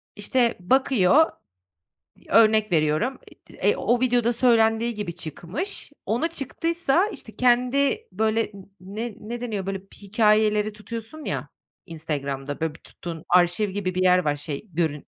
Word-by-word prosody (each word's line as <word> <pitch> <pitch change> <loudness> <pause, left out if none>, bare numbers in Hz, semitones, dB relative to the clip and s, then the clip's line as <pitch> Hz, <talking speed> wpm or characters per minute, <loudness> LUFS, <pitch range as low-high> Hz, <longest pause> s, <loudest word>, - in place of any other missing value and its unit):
İşte, 235 +3 +1
bakıyor, 260 - +3 1.0
örnek 215 -2 +4
veriyorum, 155 - +1 0.3
iii, - - -15
eee, - - +4
o 240 - +1
videoda 245 -2 +2
söylendiği 230 -1 +3
gibi 205 -5 -5
çıkmış, 175 - -5
ona 235 +10 0
çıktıysa, 335 +3 0
işte, 395 - -9
kendi 255 - +2
böyle 220 0 0
n 195 -2 -12
ne 210 +4 -6
ne 235 +3 -6
deniyor, 215 -6 -3
böyle, 195 0 -3 0.2
hikâyeleri 210 0 +2
tutuyorsun 230 +7 -8
ya - - -3 0.4
Instagram'da, 145 -4 -4
böyle, 160 -1 -2
bir - - -15
tuttuğun 165 -2 -9
arşiv 180 +3 +3
gibi 185 -2 -3
bir 185 - 0
yer 180 0 +5
var 145 -1 +1
şey 145 +5 -6
görün 155 -3 -1
215 Hz, 140 wpm, -24 LUFS, 180-240 Hz, 1.0 s, yer